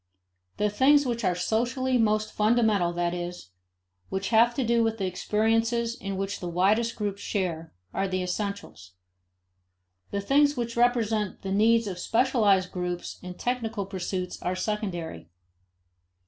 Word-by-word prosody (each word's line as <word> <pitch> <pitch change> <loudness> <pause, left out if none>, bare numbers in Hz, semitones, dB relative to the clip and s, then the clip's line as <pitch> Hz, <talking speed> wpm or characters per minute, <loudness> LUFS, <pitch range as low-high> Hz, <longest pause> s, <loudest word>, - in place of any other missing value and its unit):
The 210 0 +1
things 280 +6 +4
which 235 -2 -2
are 185 -2 +2
socially 245 +7 0
most 215 -1 +1
fundamental, 215 -5 +2
that 175 0 -1
is, 175 - -6 0.6
which 190 +1 -2
have 235 +1 +4
to 265 - 0
do 235 0 +2
with 225 0 0
the 195 - -2
experiences 225 +5 0
in 195 -5 -5
which 195 +1 -3
the 175 - -4
widest 210 +7 +2
groups 205 -2 -3
share, 170 -5 -3 0.2
are 195 0 0
the 185 -1 -1
essentials. 180 - -5 1.2
The 200 - -2
things 285 +6 +3
which 235 -1 -3
represent 230 -4 +1
the 190 - -3
needs 225 +3 +4
of 185 -3 -5
specialized 210 -5 +2
groups 180 -1 -4
and 180 0 -8
technical 230 -4 -2
pursuits 185 -1 -4
are 180 +1 -1
secondary. 185 - -4
210 Hz, 145 wpm, -27 LUFS, 185-230 Hz, 1.2 s, things